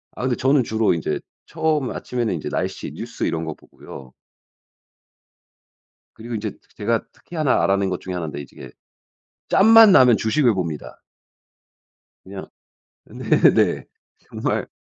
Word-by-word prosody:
아 - - -6
근데 130 -2 0
저는 135 0 +2
주로 110 -3 +1
인제 85 - -3 0.2
처음 155 -4 -1
아침에는 120 -5 -3
인제 80 - -5
날씨, - - -4
뉴스 - - -7
이런 80 0 -1
거 80 - -4
보고요. 65 -3 -14 2.0
그리고 115 +1 -7
인제 105 -1 -4 0.2
제가 - - -1
특히 175 - -14
1 155 -4 +1
알아낸 100 0 +1
것 90 - -4
중에 95 - -6
1 90 -2 -3
인데 75 -2 -6
이제 70 - -14
이게 65 - -11 0.8
짬만 225 0 +7
나면 125 -8 +6
주식을 120 0 +1
봅니다. 85 -5 -5 1.2
그냥 95 0 -8 0.6
네네. - - +2 0.3
정말 - - -3
110 Hz, 260 characters per minute, -21 LUFS, 90-135 Hz, 2.0 s, 짬만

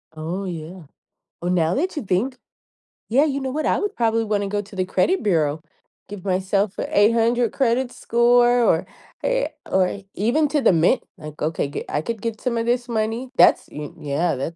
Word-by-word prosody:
Oh, 170 +5 -4
yeah. 170 0 -7 0.6
Oh, 175 - -3
now 175 -1 +2
that 355 +4 -1
you 295 - -3
think, 220 +8 -1 0.7
yeah, 265 +6 +4
you 280 -2 -1
know 265 -1 -3
what? 305 +2 -2
I - - +2
would 415 - -3
probably 225 -1 +1
wanna 205 -1 0
go 205 0 -1
to 205 0 -14
the 185 -1 0
credit 205 - +1
bureau, 160 -6 +1 0.5
give 205 -2 -9
myself 195 +1 0
an - - -2
800 230 +2 +3
credit 255 -1 +1
score, 240 +1 +3
or 165 -6 +2 0.4
eh, - - +1 0.2
or 190 +1 +1
even 245 +10 +2
to 295 -2 +1
the 195 - +4
Mint, 165 +1 +3
like, 150 -1 -10
okay, 150 -2 -2
I 150 - -1
could 225 +4 -5
get 225 -1 -4
some 240 -2 -1
of 230 - -1
this 240 +1 0
money, 225 +3 -2
that's, - - +5
y 150 -1 -6
yeah, 150 +3 -1
that's 140 +6 -4
210 Hz, 190 wpm, -22 LUFS, 180-245 Hz, 0.7 s, that's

